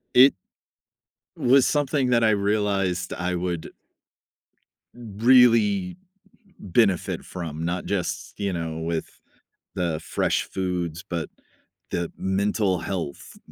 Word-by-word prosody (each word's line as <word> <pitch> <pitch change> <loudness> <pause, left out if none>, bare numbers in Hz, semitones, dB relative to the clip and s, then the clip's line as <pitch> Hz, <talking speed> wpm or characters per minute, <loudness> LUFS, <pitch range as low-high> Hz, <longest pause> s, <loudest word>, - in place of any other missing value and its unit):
It 130 +3 +8 1.0
was 130 +1 +4
something 145 -3 +1
that 115 -1 +3
I 110 - +5
realized 100 -3 0
I 90 +1 -2
would 85 -2 -3 1.2
really 125 - +3 0.6
benefit 100 -1 +1
from, 80 -3 -6
not 90 +1 -2
just, 95 -1 -3
you 100 -2 -1
know, 80 -2 -4
with 80 0 -4 0.6
the 85 -3 -1
fresh 85 - 0
foods, 90 -3 -3
but 85 -2 -3 0.6
the 85 -1 -2
mental 100 0 0
health 85 -4 -5
95 Hz, 100 wpm, -24 LUFS, 85-115 Hz, 1.2 s, It